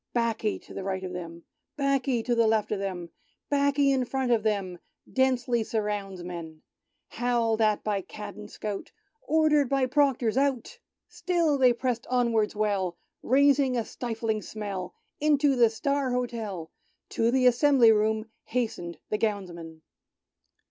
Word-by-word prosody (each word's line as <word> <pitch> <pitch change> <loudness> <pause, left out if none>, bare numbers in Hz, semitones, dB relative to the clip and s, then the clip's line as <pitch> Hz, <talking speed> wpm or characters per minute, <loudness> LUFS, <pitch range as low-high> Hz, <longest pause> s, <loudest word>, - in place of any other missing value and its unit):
'Baccy 230 -3 0
to - - -14
right 190 0 -3
of 185 -1 -5
them, 170 -1 -7 0.3
'Baccy 275 -4 +1
to 245 - 0
left 220 -2 +2
of 210 - -1
them, 180 -4 -4 0.4
'Baccy 280 0 +3
in 265 -2 +2
front 260 0 -1
of 230 -2 +3
them, 200 -5 -1 0.3
Densely 250 -3 +2
surrounds 205 -4 -3
men! 165 -3 -8 0.5
Howled 230 -2 0
at 215 -1 +2
by 205 -2 -1
cad 205 +2 -9
and 210 0 -10
scout, 210 -2 -6 0.3
Ordered 305 - +3
by 275 -1 +2
Proctors 255 -4 +1
out, 275 - 0 0.3
Still 335 -6 0
they 255 -2 +6
pressed 240 -1 -2
onwards 235 -4 +1
well. 200 -4 -1 0.2
Raising 275 0 +3
a 230 - -1
stifling 225 -3 -3
smell. 200 -5 -6 0.2
Into 290 -2 +3
the 235 -2 +5
"Star'' 280 +4 -1
Hotel, 230 -9 -3 0.4
To 230 0 +1
the 255 +1 +2
Assembly 250 -1 +6
Room, 215 0 +1 0.2
Hastened 220 -8 -3
the 210 - 0
Gownsmen. 175 -7 -3
230 Hz, 140 wpm, -27 LUFS, 205-260 Hz, 0.5 s, they